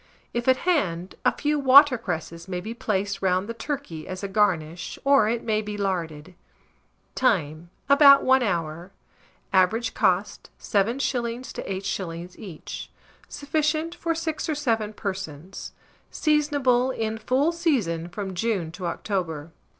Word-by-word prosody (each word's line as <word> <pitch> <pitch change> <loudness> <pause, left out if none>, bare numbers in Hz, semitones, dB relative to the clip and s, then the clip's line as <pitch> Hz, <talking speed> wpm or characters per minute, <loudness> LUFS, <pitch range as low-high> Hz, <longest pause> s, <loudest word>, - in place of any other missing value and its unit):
If 240 +1 -2
at 260 0 +5
hand, 190 - 0
a - - +4
few 295 0 -1
water 275 0 +7
cresses 170 -5 -5
may 180 -1 -3
be 220 +5 -6
placed 200 -3 -2
round 185 +1 +1
the 230 - -4
turkey 230 - -5
as 185 +1 -6
a - - -1
garnish, 180 -5 0
or 275 -6 +4
it 235 0 -1
may 215 -1 +1
be 210 -1 -6
larded. 180 -4 -3 0.8
Time. 170 - 0 0.2
About 280 0 +7
1 260 0 +4
hour. 170 -3 -2 0.6
Average 220 +5 +2
cost, 195 -2 0
7s. 235 +3 -1
to - - -5
8s. 185 -2 -4
each. 185 -8 -8 0.4
Sufficient 310 +2 -1
for 335 -1 -2
6 320 -1 -3
or 310 - 0
7 225 -7 0
persons. 190 -4 -6 0.4
Seasonable. 285 -5 +2
In 220 -3 -3
full 270 +8 +2
season 230 - 0
from 190 +1 -5
June 185 -4 -1
to 180 +1 -5
October. 170 -5 -3
210 Hz, 135 wpm, -25 LUFS, 180-260 Hz, 0.8 s, water